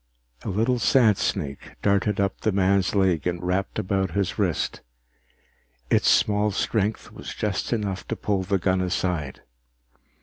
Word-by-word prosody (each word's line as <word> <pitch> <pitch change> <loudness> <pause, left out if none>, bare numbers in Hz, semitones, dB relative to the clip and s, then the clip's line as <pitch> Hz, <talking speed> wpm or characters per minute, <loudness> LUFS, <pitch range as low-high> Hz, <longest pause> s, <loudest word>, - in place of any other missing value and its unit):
A - - -4
little 115 +6 +1
sandsnake 110 - +1
darted 100 0 +2
up 100 -1 -1
the 110 - +1
man's 95 0 +2
leg 95 -5 +2
and 90 -1 -1
wrapped 90 +2 -1
about 95 -2 -1
his 100 +1 -1
wrist. 95 -6 -1 1.1
Its - - +4
small 105 0 +3
strength 105 +1 -1
was - - -8
just 105 -3 -2
enough 105 -5 -2
to 115 - -2
pull 100 -3 -1
the 95 +1 0
gun 95 0 +1
aside. 90 -5 -2
100 Hz, 140 wpm, -25 LUFS, 95-105 Hz, 1.1 s, Its